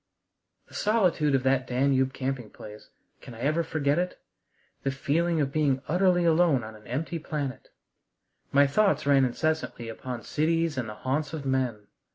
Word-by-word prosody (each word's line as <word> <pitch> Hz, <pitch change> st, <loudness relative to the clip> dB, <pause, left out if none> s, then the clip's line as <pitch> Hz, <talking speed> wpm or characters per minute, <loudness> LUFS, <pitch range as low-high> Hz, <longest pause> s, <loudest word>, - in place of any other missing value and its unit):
The -, -, -20 dB
solitude 180 Hz, -9 st, +2 dB
of 130 Hz, -, 0 dB
that 130 Hz, -1 st, +2 dB
Danube 130 Hz, +1 st, +2 dB
camping 130 Hz, -4 st, -4 dB
place, 105 Hz, +1 st, -12 dB, 0.3 s
can 120 Hz, -, -10 dB
I 115 Hz, -, -10 dB
ever 155 Hz, +5 st, +1 dB
forget 155 Hz, -1 st, 0 dB
it? 180 Hz, 0 st, -3 dB, 0.6 s
The 135 Hz, -, -1 dB
feeling 160 Hz, +5 st, 0 dB
of 140 Hz, -2 st, 0 dB
being 140 Hz, -3 st, +1 dB
utterly 180 Hz, +1 st, +3 dB
alone 165 Hz, -6 st, +3 dB
on 110 Hz, 0 st, -8 dB
an 105 Hz, 0 st, -16 dB
empty 160 Hz, +7 st, -3 dB
planet! 145 Hz, -5 st, -5 dB, 0.8 s
My 140 Hz, +1 st, +5 dB
thoughts 155 Hz, +2 st, +2 dB
ran 140 Hz, -2 st, +5 dB
incessantly 130 Hz, -3 st, -2 dB
upon 120 Hz, +1 st, -6 dB
cities 165 Hz, +1 st, 0 dB
and 125 Hz, -4 st, -3 dB
the 105 Hz, -, -7 dB
haunts 140 Hz, +7 st, -2 dB
of 150 Hz, -3 st, -5 dB
men. 130 Hz, -6 st, -1 dB
140 Hz, 165 wpm, -27 LUFS, 130-160 Hz, 0.8 s, My